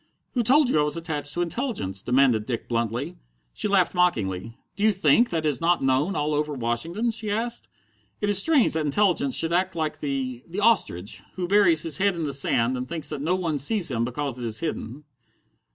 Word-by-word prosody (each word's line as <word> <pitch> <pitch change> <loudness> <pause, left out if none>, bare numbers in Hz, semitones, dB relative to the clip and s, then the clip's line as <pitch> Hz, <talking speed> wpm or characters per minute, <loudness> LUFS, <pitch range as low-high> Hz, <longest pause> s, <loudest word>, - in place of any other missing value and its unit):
"Who 245 - +1
told 270 +5 +4
you - - +2
I - - +4
was 150 +2 -1
attached 150 -4 -1
to 175 - +1
Intelligence?" 170 - -3
demanded 125 -3 +2
Dick 120 -3 -4
bluntly. 120 +7 -2 0.4
She - - -2
laughed 195 -3 +2
mockingly. 115 - -1 0.2
"Do 205 - -4
you 220 - +5
think 190 - +3
that 160 -2 -2
is 145 -4 +1
not 170 -2 +2
known 135 +8 +1
all 150 +1 -1
over 150 0 -1
Washington?" 160 - -1
she 220 -1 -1
asked. 230 +3 -3 0.5
"It 205 - -1
is 205 -2 +5
strange 290 +1 +3
that 160 -1 0
Intelligence 150 -3 +1
should 165 +1 +1
act 185 +1 0
like 155 -2 -3
the 130 -4 -4
the 180 +4 -5
ostrich, 190 - +1
who 180 -1 -3
buries 180 -5 +4
his 160 -4 -2
head 200 -1 +1
in 165 - -3
the 145 -2 -2
sand 130 -2 +1
and 125 +1 -5
thinks 155 -3 -4
that 150 -3 -5
no 170 +5 +1
one 165 -5 -2
sees 170 +3 +2
him 115 -2 -1
because 125 +1 -4
it - - -6
is 110 -2 -2
hidden." 150 -4 -5
155 Hz, 210 wpm, -24 LUFS, 130-190 Hz, 0.5 s, you